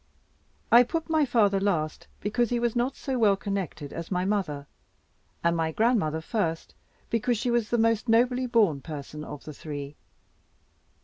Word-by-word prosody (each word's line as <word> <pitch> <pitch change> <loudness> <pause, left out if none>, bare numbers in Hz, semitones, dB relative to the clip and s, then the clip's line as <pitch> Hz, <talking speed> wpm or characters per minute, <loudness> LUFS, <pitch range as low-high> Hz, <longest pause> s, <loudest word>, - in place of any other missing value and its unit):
I 235 - +9
put 325 +6 -2
my 310 -2 +4
father 210 -6 +3
last, 165 -6 -1
because 225 +3 0
he 245 - +1
was 235 -1 0
not 245 +3 0
so 265 -2 -3
well 205 -3 +5
connected 195 -7 -4
as 165 0 -6
my 180 -1 0
mother, 180 -9 -1 0.8
and 170 0 +3
my 160 -1 0
grandmother 195 -7 +1
first, 165 -4 -2 0.4
because 230 +1 +1
she 240 +3 -1
was 235 -2 +1
the 240 - +1
most 230 0 +2
nobly 250 +2 +3
born 210 - +3
person 150 0 -7
of 150 -2 -8
the 155 - -8
three. 145 -1 -7
205 Hz, 165 wpm, -27 LUFS, 160-240 Hz, 0.8 s, I